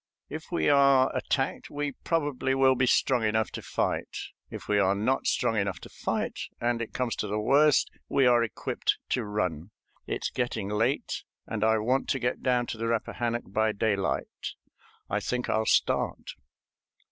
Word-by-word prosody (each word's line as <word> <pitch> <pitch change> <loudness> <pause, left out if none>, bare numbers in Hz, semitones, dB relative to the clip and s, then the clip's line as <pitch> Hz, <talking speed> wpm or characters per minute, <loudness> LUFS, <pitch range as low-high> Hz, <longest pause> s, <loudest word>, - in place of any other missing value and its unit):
If 155 +4 -7
we 170 - +1
are 140 -2 +5
attacked, 135 -1 -1
we 145 0 -2
probably 145 -3 -1
will 135 0 +5
be 130 0 +1
strong 125 -1 +3
enough 110 0 +1
to - - -6
fight. - - -2 0.3
If - - -8
we 105 -1 +3
are 95 0 +3
not 120 +7 0
strong 115 - +1
enough 100 -3 -1
to - - -10
fight, - - -3 0.2
and 120 0 0
it 115 - -4
comes 125 -2 -1
to 105 - -2
the 105 +1 -2
worst, 145 +8 +4 0.2
we 135 - +3
are 120 -1 +5
equipped 115 - -1
to 125 - 0
run. 90 -5 -2 0.4
It's - - -2
getting 115 -5 -2
late, 105 +2 0 0.2
and 110 -1 -3
I 110 0 +4
want 125 +5 0
to 135 - +1
get 125 0 -1
down 125 -1 +2
to 110 - -10
the 115 - -1
Rappahannock 115 -1 -2
by 110 0 +2
daylight. 100 -2 -1 0.5
I - - 0
think 125 -1 -2
I'll 110 0 +1
start." - - +1
120 Hz, 170 wpm, -28 LUFS, 105-130 Hz, 0.5 s, are